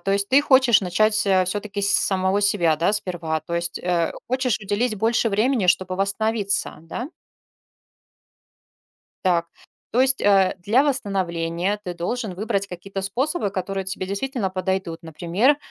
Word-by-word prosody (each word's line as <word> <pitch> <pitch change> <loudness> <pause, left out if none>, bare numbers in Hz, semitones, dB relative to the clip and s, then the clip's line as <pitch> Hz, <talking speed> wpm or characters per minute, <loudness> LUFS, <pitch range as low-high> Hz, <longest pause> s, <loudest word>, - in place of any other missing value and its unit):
то 195 - +1
есть 200 0 0
ты 270 +2 +6
хочешь 260 -5 +5
начать, 210 +4 +1
э, 190 -1 +4
всё-таки 205 +2 -4
с 200 - +2
самого 190 +1 +2
себя, 175 -6 +2
да, 170 +6 +1
сперва? 175 -6 -2
То 165 +3 -6
есть, 170 0 -2
э, 175 -2 0 0.2
хочешь 255 -3 0
уделить 215 +3 -1
больше 225 +2 +1
времени, 220 +1 +1
чтобы 185 +1 +1
восстановиться, 200 +1 -1
да? 235 - -6 2.2
Так. 170 -2 +2 0.5
То 245 - +3
есть, 265 0 +2
э, 195 -2 +4
для 210 +9 +3
восстановления 190 - -1
ты 180 -3 -5
должен 195 +4 -3
выбрать 200 0 -2
какие-то 195 +1 -6
способы, 235 - -1
которые 195 0 -3
тебе 190 0 -4
действительно 200 +1 -2
подойдут. 185 -3 -3
Например, 175 - +1
195 Hz, 145 wpm, -23 LUFS, 180-220 Hz, 2.2 s, ты